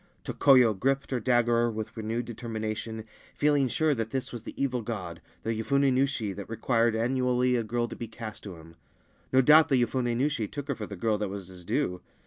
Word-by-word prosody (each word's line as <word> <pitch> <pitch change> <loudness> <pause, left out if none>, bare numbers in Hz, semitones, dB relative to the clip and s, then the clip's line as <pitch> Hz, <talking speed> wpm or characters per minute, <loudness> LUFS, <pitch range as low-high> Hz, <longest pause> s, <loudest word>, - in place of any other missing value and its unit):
Tokoyo 125 -5 +5
gripped 135 +8 -1
her 130 - 0
dagger 120 -1 +2
with 110 -1 -5
renewed 115 +1 -3
determination, 110 -1 -5 0.3
feeling 145 -2 +3
sure 155 +4 +1
that 115 -4 -3
this 130 +2 -3
was 120 - -6
the - - -10
evil 125 -3 0
god, 100 -7 -5 0.2
the 115 - -1
Yofune 135 +4 +2
Nushi 130 -6 0
that 100 +1 -8
required 115 0 +1
annually 125 +1 +1
a 120 - +1
girl 120 +2 -1
to - - -8
be 115 - -6
cast 110 0 -8
to 95 -3 -7
him. 80 0 -15 0.5
No 130 - +5
doubt 155 +4 +6
the 135 -3 +3
Yofun6 120 0 0
Nushi 135 -4 0
took 145 +3 -7
her 140 - 0
for 105 -3 -6
the 100 - -7
girl 105 +3 0
that 105 -2 -2
was 95 -2 -7
his 90 -1 -12
due. 90 +1 -1
115 Hz, 205 wpm, -28 LUFS, 110-130 Hz, 0.5 s, doubt